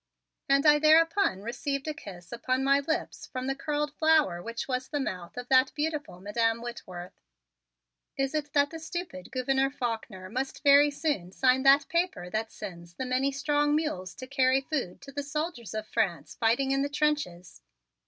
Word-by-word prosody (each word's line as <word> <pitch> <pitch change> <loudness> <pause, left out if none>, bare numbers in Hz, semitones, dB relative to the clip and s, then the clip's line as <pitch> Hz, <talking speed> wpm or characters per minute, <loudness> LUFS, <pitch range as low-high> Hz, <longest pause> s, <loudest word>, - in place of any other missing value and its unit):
And 275 +1 +4
I 295 0 +7
thereupon 320 - +4
received 275 +5 -3
a 310 - -1
kiss 180 -9 -11
upon 255 +2 -1
my 275 +1 +4
lips 300 +3 -3
from 255 0 -5
the 270 - 0
curled 295 +1 -2
flower 310 - +3
which 230 +4 -5
was 255 -1 -2
the 295 - -2
mouth 180 -9 -5
of 245 0 -5
that 260 0 +5
beautiful 300 - -3
Madam 225 +3 0
Whitworth. 185 -7 -8 1.0
"Is 270 +1 0
it 295 -2 -2
that 285 0 +3
the 325 - -6
stupid 320 - -6
Gouverneur 270 +1 +1
Faulkner 225 -7 -4
must 260 +9 -4
very 285 0 +7
soon 285 - -2
sign 255 +5 +3
that 275 +1 +6
paper 335 - -1
that 220 +1 -2
sends 170 -2 -9
the 260 - -4
many 255 +2 +1
strong 295 +1 +1
mules 185 - -2
to 255 - -8
carry 260 0 +3
food 270 - -3
to 280 0 -10
the 285 - -3
soldiers 285 - -4
of 215 0 -3
France 175 -8 -1
fighting 245 +4 +1
in 275 0 +2
the 285 - 0
trenches?" 285 - -1
270 Hz, 175 wpm, -28 LUFS, 225-295 Hz, 1.0 s, I